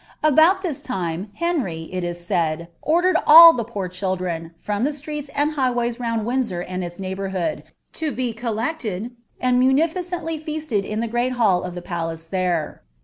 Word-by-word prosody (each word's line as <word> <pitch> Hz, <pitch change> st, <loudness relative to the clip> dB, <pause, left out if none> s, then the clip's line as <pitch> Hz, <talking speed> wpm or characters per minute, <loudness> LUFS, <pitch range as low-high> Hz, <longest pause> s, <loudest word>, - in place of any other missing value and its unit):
Il 310 Hz, -1 st, +4 dB, 0.3 s
this 320 Hz, -7 st, -3 dB
time, 185 Hz, -5 st, -3 dB
Henry, 265 Hz, -, -1 dB
it 185 Hz, -1 st, -3 dB
is 175 Hz, 0 st, -5 dB
said, 165 Hz, -1 st, -1 dB
ordered 350 Hz, +4 st, +3 dB
all 330 Hz, +2 st, +11 dB
the 235 Hz, -, -2 dB
poor 205 Hz, -4 st, -4 dB
children, 180 Hz, -3 st, -3 dB
from 205 Hz, +5 st, -2 dB
laand 295 Hz, 0 st, -2 dB
highways 245 Hz, -4 st, 0 dB
round 230 Hz, -3 st, -1 dB
Windsor 235 Hz, -7 st, -1 dB
and 185 Hz, +1 st, -4 dB
its 175 Hz, +1 st, -7 dB
neighbourhood, 190 Hz, -1 st, -3 dB, 0.4 s
lo 315 Hz, -, 0 dB
be 250 Hz, -4 st, -2 dB
1, 225 Hz, 0 st, -3 dB
anil 230 Hz, -, -3 dB, 0.3 s
munificently 320 Hz, +7 st, +1 dB
feasted 305 Hz, -10 st, -2 dB
in 215 Hz, +1 st, -3 dB
the 235 Hz, -, -1 dB
great 240 Hz, +3 st, 0 dB
hall 210 Hz, -7 st, +3 dB
of 180 Hz, -1 st, -6 dB
the 175 Hz, -, -7 dB
palace 165 Hz, -2 st, -4 dB
there. 175 Hz, -3 st, -2 dB
225 Hz, 155 wpm, -22 LUFS, 180-280 Hz, 0.4 s, all